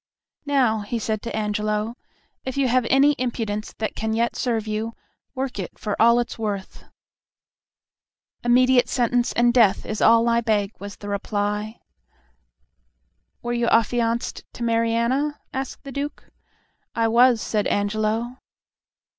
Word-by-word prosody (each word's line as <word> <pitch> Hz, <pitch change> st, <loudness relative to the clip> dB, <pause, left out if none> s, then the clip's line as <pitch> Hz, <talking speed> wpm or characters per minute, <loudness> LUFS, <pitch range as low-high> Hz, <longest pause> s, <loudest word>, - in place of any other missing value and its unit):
"Now," 255 Hz, -6 st, +2 dB
he 210 Hz, +3 st, -3 dB
said 215 Hz, -1 st, -2 dB
to 230 Hz, -, -5 dB
Angelo, 210 Hz, +1 st, -1 dB, 0.5 s
"if 260 Hz, +1 st, -5 dB
you 275 Hz, -1 st, +2 dB
have 250 Hz, -1 st, +2 dB
any 280 Hz, +2 st, +5 dB
impudence 225 Hz, -4 st, -3 dB
that 220 Hz, -, -3 dB
can 220 Hz, 0 st, -2 dB
yet 235 Hz, +1 st, 0 dB
serve 230 Hz, -4 st, -1 dB
you, 215 Hz, +1 st, -3 dB, 0.4 s
work 260 Hz, -4 st, -3 dB
it 185 Hz, -, -6 dB
for 210 Hz, -, -3 dB
all 235 Hz, +1 st, +6 dB
it's 240 Hz, -1 st, -4 dB
worth." 205 Hz, -3 st, -4 dB, 1.6 s
"Immediate 250 Hz, +1 st, +4 dB
sentence 245 Hz, -1 st, +1 dB
and 240 Hz, 0 st, +3 dB
death 225 Hz, -6 st, +4 dB
is 215 Hz, -, -4 dB
all 230 Hz, +1 st, +5 dB
I 235 Hz, 0 st, +3 dB
beg," 210 Hz, -3 st, 0 dB
was 200 Hz, 0 st, -8 dB
the 205 Hz, -, -10 dB
reply. 210 Hz, +2 st, -2 dB, 1.6 s
"Were 240 Hz, 0 st, -2 dB
you 235 Hz, -1 st, 0 dB
affianced 230 Hz, +1 st, +1 dB
to 240 Hz, -, -6 dB
Mariana?" 235 Hz, +5 st, +1 dB
asked 265 Hz, 0 st, -5 dB
the 275 Hz, -, -8 dB
Duke. 280 Hz, +2 st, -5 dB, 0.6 s
"I 230 Hz, 0 st, +2 dB
was," 240 Hz, +1 st, +5 dB
said 210 Hz, -1 st, -1 dB
Angelo. 215 Hz, +4 st, -1 dB
230 Hz, 140 wpm, -23 LUFS, 215-245 Hz, 1.6 s, all